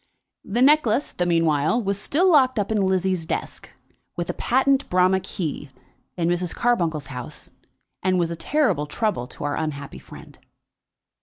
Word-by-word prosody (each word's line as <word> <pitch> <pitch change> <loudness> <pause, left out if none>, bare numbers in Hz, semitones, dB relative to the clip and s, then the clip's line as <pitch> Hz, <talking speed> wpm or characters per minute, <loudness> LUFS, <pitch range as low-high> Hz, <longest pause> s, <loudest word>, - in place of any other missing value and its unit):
The 235 +5 0
necklace, 285 -3 +3
the 175 - -1
meanwhile, 165 +3 +2
was 200 -3 -2
still 360 - +2
locked 260 -5 +4
up 205 0 -1
in 210 -2 +1
Lizzie's 185 -3 0
desk, - - -5 0.5
with 175 -1 -2
a - - -10
patent 270 +2 +1
Bramah 185 +1 +3
key, 165 -6 -5 0.5
in 170 -1 0
Mrs. 175 0 -1
Carbuncle's 170 -11 0
house, 125 -1 -8 0.5
and 185 0 +1
was 170 -1 0
a - - -3
terrible 170 - 0
trouble 205 - -2
to - - -10
our 145 0 -1
unhappy 140 -3 -5
friend. - - -14
185 Hz, 155 wpm, -23 LUFS, 165-240 Hz, 0.5 s, locked